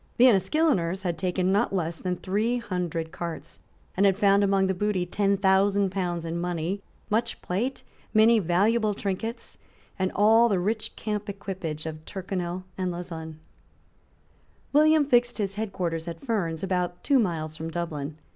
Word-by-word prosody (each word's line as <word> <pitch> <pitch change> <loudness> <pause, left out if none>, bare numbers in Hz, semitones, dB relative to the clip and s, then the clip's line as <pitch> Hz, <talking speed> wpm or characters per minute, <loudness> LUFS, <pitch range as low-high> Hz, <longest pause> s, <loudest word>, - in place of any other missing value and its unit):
The 245 - +7
Enniskilleners 195 - +2
had 175 -3 -1
taken 185 +1 0
not 200 0 +1
less 165 -2 -2
than 180 -1 -2
three 210 +7 0
hundred 175 -7 -3
cars, 165 -1 -6 0.4
and 195 - +2
had 195 -1 +2
found 200 -1 +4
among 195 -1 +3
the 190 - +1
booty 190 -1 0
ten 200 +2 +1
thousand 195 0 +3
pounds 175 -3 -2
in 165 +1 -3
money, 175 +2 -2 0.3
much 230 +2 0
plate, 240 +9 -2 0.3
many 225 +1 +5
valuable 210 +4 +2
trinkets, 205 +4 -4 0.4
and 185 0 +1
all 225 +3 +5
the 200 - +2
rich 215 +5 -2
camp 210 -1 -3
equipage 185 -6 -5
of 155 -1 -6
Tyrconnel 185 -2 -4 0.2
and 185 -1 0
Lauzun, 165 -2 -6 1.4
William 305 0 +5
fixed 245 -2 +3
his 200 -3 -1
head 215 0 -3
quarters 165 -3 -3
at 165 -1 -5
Ferns, 175 - -1
about 180 -2 -1
two 280 -2 +4
miles 160 -7 -1
from 160 +1 -5
Dublin. 155 -3 -4
190 Hz, 155 wpm, -26 LUFS, 175-210 Hz, 1.4 s, The